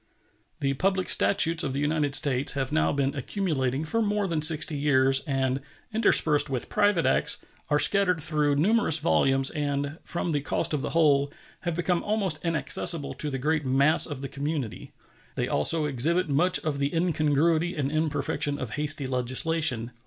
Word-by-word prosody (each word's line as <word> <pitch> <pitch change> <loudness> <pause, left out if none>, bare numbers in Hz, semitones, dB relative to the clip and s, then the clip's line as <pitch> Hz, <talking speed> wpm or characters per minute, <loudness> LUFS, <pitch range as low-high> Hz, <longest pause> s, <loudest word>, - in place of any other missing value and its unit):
The 135 -1 0
public 185 +5 -1
statutes 165 -4 +3
of 135 - -3
the 135 - -3
United 150 -1 0
States 140 -3 +1
have 135 -2 -4
now 80 +1 +1
been 140 -1 -2
accumulating 140 -4 -3
for 225 +9 -1
more 205 -2 -1
than 165 -3 -2
sixty 155 0 +2
years, 135 -2 +2
and, 135 -1 -2 0.3
interspersed 160 -10 +3
with 130 -3 -5
private 205 -5 +1
acts, - - +1 0.2
are 150 - +2
scattered 180 +1 +3
through 150 -2 0
numerous 185 +1 +3
volumes, 135 -3 +1
and, 145 +1 -4
from 175 -1 -4
the 145 -2 -1
cost 145 - -2
of 150 - -2
the - - -4
whole, 145 -4 +1 0.3
have 175 -2 -4
become 175 0 -1
almost 200 -7 -1
inaccessible 165 -2 +1
to 150 - -1
the 135 - -4
great 150 +3 -1
mass 140 +4 +3
of 145 -5 -7
the 140 - -5
community. 140 -4 -6 0.4
They - - -2
also 160 -2 +4
exhibit 160 +7 0
much 170 +6 +1
of 150 -3 -4
the 140 0 -1
incongruity 165 +1 0
and 140 -2 -3
imperfection 150 -2 -2
of 125 -5 -7
hasty 150 -1 +1
legislation. 130 0 -1
150 Hz, 165 wpm, -25 LUFS, 140-165 Hz, 0.4 s, also